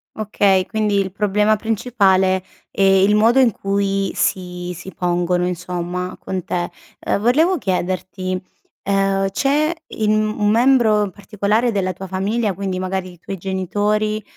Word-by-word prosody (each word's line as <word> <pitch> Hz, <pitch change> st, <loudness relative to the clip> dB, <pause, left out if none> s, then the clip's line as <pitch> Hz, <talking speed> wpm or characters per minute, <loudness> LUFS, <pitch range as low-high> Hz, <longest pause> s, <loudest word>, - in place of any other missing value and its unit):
Okay, 200 Hz, -3 st, +1 dB
quindi 210 Hz, -2 st, 0 dB
il 190 Hz, -1 st, -1 dB
problema 210 Hz, +2 st, +2 dB
principale 195 Hz, -4 st, +1 dB, 0.3 s
è -, -, -4 dB
il 195 Hz, +2 st, +5 dB
modo 230 Hz, +5 st, +4 dB
in 245 Hz, -4 st, +5 dB
cui 195 Hz, 0 st, -1 dB
si 180 Hz, -1 st, -2 dB
si 180 Hz, +3 st, -10 dB
pongono 175 Hz, 0 st, 0 dB
insomma, 180 Hz, 0 st, -4 dB
con 185 Hz, -2 st, -4 dB
te. 175 Hz, -1 st, -2 dB, 0.3 s
Ehm, -, -, -1 dB
volevo 310 Hz, -, +3 dB
chiederti, 185 Hz, -2 st, -2 dB, 0.4 s
ehm, 195 Hz, 0 st, +1 dB
c'è 295 Hz, +8 st, +1 dB
in 215 Hz, -1 st, -1 dB
un 215 Hz, -1 st, 0 dB
membro 225 Hz, -4 st, +3 dB
particolare 210 Hz, +4 st, -1 dB
della 185 Hz, -3 st, -1 dB
tua 190 Hz, +2 st, -8 dB
famiglia, 200 Hz, +3 st, -1 dB
quindi 190 Hz, 0 st, -3 dB
magari 185 Hz, -1 st, -3 dB
i -, -, -17 dB
tuoi 195 Hz, +3 st, -6 dB
genitori, 205 Hz, +3 st, -1 dB
195 Hz, 140 wpm, -19 LUFS, 185-215 Hz, 0.4 s, il